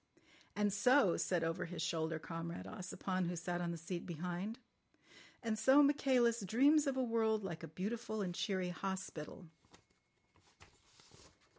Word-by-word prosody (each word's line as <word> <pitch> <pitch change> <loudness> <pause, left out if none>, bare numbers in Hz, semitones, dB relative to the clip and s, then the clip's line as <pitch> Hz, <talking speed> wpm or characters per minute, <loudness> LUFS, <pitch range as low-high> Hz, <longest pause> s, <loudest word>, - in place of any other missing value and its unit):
"And 205 -1 +1
so," 210 -2 +4
said 175 -3 0
over 165 +2 -1
his 170 -1 -7
shoulder 160 0 -1
Comrade 165 +1 -6
Ossipon, 185 -2 -3
who 175 - -2
sat 175 +1 -3
on 175 - -1
the 170 - -3
seat 170 +2 -5
behind. 180 +6 -4 0.9
"And 220 -2 -1
so 270 +5 +6
Michaelis 260 -5 +3
dreams 275 - +4
of 270 -1 0
a 260 - +2
world 220 -2 +1
like 170 -4 -5
a 165 - -6
beautiful 215 +7 -4
and 180 -2 -3
cheery 185 0 -1
hospital." 185 -2 -5
190 Hz, 140 wpm, -37 LUFS, 170-230 Hz, 0.9 s, so